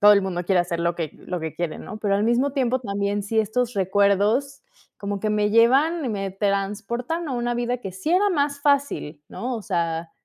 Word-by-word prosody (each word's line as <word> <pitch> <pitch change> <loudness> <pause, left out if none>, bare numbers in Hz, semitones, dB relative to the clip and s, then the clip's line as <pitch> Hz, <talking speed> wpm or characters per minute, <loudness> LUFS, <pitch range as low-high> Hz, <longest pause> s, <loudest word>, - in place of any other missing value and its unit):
todo 205 0 +8
el 200 -1 +4
mundo 180 -2 -3
quiere 180 0 +3
hacer 170 -1 -2
lo 170 0 +1
que 160 -3 -3
lo 180 - -5
que 160 -2 -5
quiere, 170 -3 -3
¿no?, 215 - -8
pero 200 -2 +1
al 205 - +1
mismo 240 +4 +2
tiempo 255 -2 +1
también, 200 -2 -2
sí 220 +3 -1
estos 235 +3 0
recuerdos, 200 - +2 0.3
como 200 0 -4
que 215 +1 0
me 210 0 +1
llevan 270 +9 +4
y - - -1
me 195 -3 -2
transportan 210 - -2
a - - -3
una 240 -1 -1
vida 240 +1 -1
que 195 -6 -7
sí 190 - -4
era 395 +3 +4
más 285 -3 0
fácil, 280 - 0
¿no? 250 +1 -4
O 220 - -5
sea, 170 -3 -2
210 Hz, 215 wpm, -24 LUFS, 195-250 Hz, 0.3 s, todo